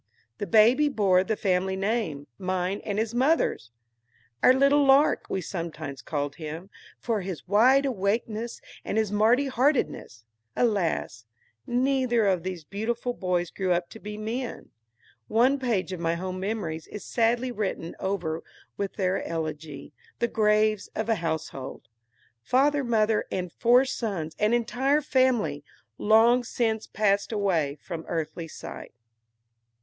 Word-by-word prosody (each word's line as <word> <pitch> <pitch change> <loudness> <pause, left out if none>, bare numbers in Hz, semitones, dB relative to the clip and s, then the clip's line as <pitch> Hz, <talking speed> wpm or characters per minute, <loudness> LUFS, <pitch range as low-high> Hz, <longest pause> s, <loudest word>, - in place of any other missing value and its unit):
The 205 - -3
baby 240 +7 +5
bore 195 -8 +3
the 220 +2 -1
family 190 -2 0
name, 195 -8 -2
mine 185 +1 -2
and 205 -1 -3
his 220 +1 -1
mother's; 260 - +1 0.7
"our - - +7
little 275 +2 +4
Lark," 275 +2 +4
we 190 - -1
sometimes 160 -6 -6
called 145 -2 -3
him, 160 +4 -7 0.3
for 225 -4 -1
his 180 -3 -6
wide 255 +8 +5
awakeness 225 0 -2 0.2
and - - -3
his 220 -2 +1
merry 225 +6 +3
heartedness.(Alas! 165 - -1 0.4
neither 250 -2 +2
of 185 -3 +2
those 180 -2 -5
beautiful 230 +8 -3
boys 180 -5 -1
grew 185 -2 0
up 175 0 -1
to 225 - -10
be 210 0 -7
men! 235 +4 -5 0.6
One 255 +5 +3
page 220 -8 -1
of 180 - -5
my 165 0 0
home 185 +1 -4
memories 190 -6 -3
is 210 - -8
sadly 240 +2 +1
written 200 -7 -3
over 175 -4 -2 0.4
with 200 -1 -3
their 190 -1 0
elegy, 155 -3 -5 0.2
the 235 - +1
"Graves 215 -2 +2
of 220 +1 -2
a 225 - +4
Household." 160 -5 -4 0.5
Father, 280 - +2
mother, 220 -3 +2
and 180 -2 -3
four 245 +3 +4
sons, 190 -12 -3
an 210 +1 +2
entire 265 +5 +1
family, 240 - +1 0.4
long 230 +3 +5
since 225 -2 -1
passed 200 -1 +1
away 170 -9 0
from 165 -1 -6
earthly 165 0 -3
sight.) - - -9
210 Hz, 135 wpm, -26 LUFS, 175-235 Hz, 0.7 s, our